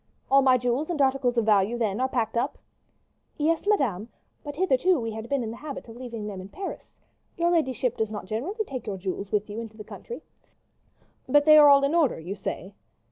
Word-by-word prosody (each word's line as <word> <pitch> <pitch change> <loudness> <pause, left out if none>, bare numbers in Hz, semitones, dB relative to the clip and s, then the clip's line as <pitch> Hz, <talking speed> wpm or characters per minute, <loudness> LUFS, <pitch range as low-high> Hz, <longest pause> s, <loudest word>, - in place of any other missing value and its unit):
"All 275 0 +7
my 260 -1 +5
jewels 245 +6 -1
and 340 -4 -2
articles 265 -3 +2
of 230 - +2
value, 210 +2 +3
then, 215 -2 -1
are 260 - +1
packed 230 -4 -1
up?" 245 +5 -1 0.8
"Yes, 325 +5 0
madame; 240 - +1 0.3
but 290 -1 -7
hitherto 355 +1 +2
we 225 -1 -3
have 220 +2 -7
been 275 -3 0
in 220 - -4
the 230 - -8
habit 295 -4 -7
of 225 - -11
leaving 235 -4 -7
them 200 -3 -6
in 190 - -10
Paris. 385 - -8 0.4
Your 345 0 +2
ladyship 260 -7 0
does 220 -1 -1
not 210 -2 -6
generally 325 - -3
take 255 - -7
your 200 -2 -3
jewels 190 +1 -5
with 210 -1 0
you 210 +1 -6
into 225 -1 -8
the 210 - -8
country." 475 - -9 1.1
"But 290 +2 +5
they 305 -1 +8
are 295 -1 +9
all 280 0 +6
in 280 +3 +1
order, 325 - +2
you 175 +5 -5
say?" 195 -1 -6
245 Hz, 215 wpm, -26 LUFS, 215-290 Hz, 1.1 s, are